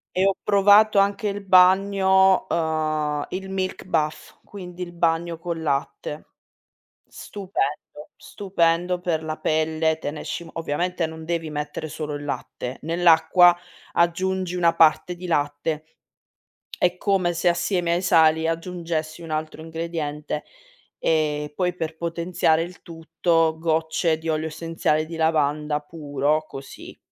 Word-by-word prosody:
E 185 - +2
ho 195 -1 +3
provato 205 +1 +5
anche 200 +1 +2
il 200 0 -4
bagno, 190 0 +5
uhm, 155 -2 -1
il 190 +1 -5
milk 190 -1 -3
bath 155 -4 -2
quindi 180 -3 -10
il 175 -1 -5
bagno 170 0 0
col 170 -1 -5
latte. 150 0 -3 0.8
Stupendo. 185 -8 -4 0.3
Stupendo 180 -2 0
per 165 -3 -2
la 155 0 -4
pelle. 160 0 0
Te 145 - -4
ne 150 - -8
esci 170 - -5
m 165 - -13
ovviamente 170 +2 -2
non 160 0 -9
devi 165 -1 -2
mettere 150 +1 -4
solo 150 -1 -5
il 145 - -6
latte, 130 -2 -5
nell'acqua 170 +1 +5 0.4
aggiungi 185 +1 0
una 170 -2 +2
parte 165 +2 +4
di 180 - -9
latte. 145 0 -1 1.0
È 180 0 +3
come 190 -4 +1
se 175 +1 +2
assieme 175 0 0
ai 175 - -1
sali 160 -2 +4
aggiungessi 165 -1 -3
un 160 - -8
altro 155 0 -4
ingrediente, 160 -2 -4 0.6
ehm, 150 -2 0
poi 180 0 0
per 160 -2 -4
potenziare 170 -1 0
il 175 +2 -8
tutto, 165 0 0
gocce 160 0 0
di 160 0 -5
olio 155 0 0
essenziale 160 -1 -1
di 165 - -7
lavanda 150 -2 +1
puro 150 0 -2
così 135 -2 -10
165 Hz, 135 wpm, -23 LUFS, 155-180 Hz, 1.0 s, provato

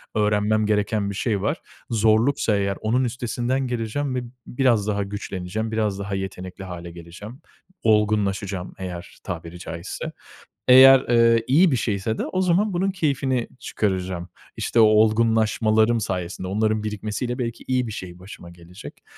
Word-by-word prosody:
öğrenmem 105 0 +2
gereken 105 -1 0
bir 100 - -5
şey 105 -3 -1
var. 145 - -1 0.3
Zorluksa 110 +1 +2
eğer 100 -1 -1
onun 120 +4 +1
üstesinden 125 +2 -2
geleceğim 125 +3 -2
ve 125 - -2 0.2
biraz 120 -5 +1
daha 100 -1 0
güçleneceğim, 100 +1 -5
biraz 105 -3 -1
daha 100 0 -3
yetenekli 95 0 -6
hâle 85 -2 -8
geleceğim. 90 +9 -11 0.4
Olgunlaşacağım 100 -3 +1
eğer 90 -2 -7
tabiri 85 -1 -7
caizse. 85 +1 -6 0.6
Eğer, 130 +1 +9
ııı, 115 -2 +4
iyi 160 +5 +5
bir - - +2
şeyse 110 -1 -1
de - - -2
o 185 - -1
zaman 185 +3 +2
bunun 190 +3 0
keyfini 135 -8 -1
çıkaracağım. 95 -3 -2 0.3
İşte, 115 - 0
o - - +8
olgunlaşmalarım 110 +1 +3
sayesinde 90 -2 -4
onların 110 +2 0
birikmesiyle 110 +3 -3
belki 115 -2 -4
iyi 125 -2 0
bir - - -5
şey 90 -3 -8
başıma 90 -2 -11
gelecek. 85 +2 -13
110 Hz, 145 wpm, -23 LUFS, 95-120 Hz, 0.6 s, Eğer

